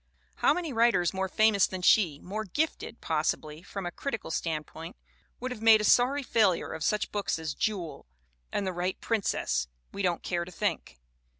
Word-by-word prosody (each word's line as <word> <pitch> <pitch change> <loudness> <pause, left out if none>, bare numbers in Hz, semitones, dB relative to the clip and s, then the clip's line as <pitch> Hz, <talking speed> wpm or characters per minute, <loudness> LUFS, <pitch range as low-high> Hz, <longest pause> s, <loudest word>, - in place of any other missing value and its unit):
How - - +4
many 335 -6 -2
writers 225 -7 +3
more 190 0 -1
famous 215 -1 +4
than 185 -1 -6
she, 175 -7 +4
more 210 +4 -4
gifted, 290 - -3
possibly, 155 0 -1
from 195 +1 -6
a 175 - -3
critical 225 -4 -4
standpoint, 160 0 -4 0.4
would 255 +1 -4
have 220 - -6
made 225 -1 +7
a - - -2
sorry 255 +6 +4
failure 210 -8 +2
of 160 - -5
such 210 +6 0
books 205 -4 -1
as 160 -2 -4
Jewel 180 - -3 0.4
and 200 - -1
The 185 - -2
Right 180 +2 -2
Princess 65 - -1 0.2
we 200 - -5
don't 175 -3 0
care 175 -1 -1
to 175 - -10
think. 65 - -3
190 Hz, 180 wpm, -29 LUFS, 165-220 Hz, 0.4 s, made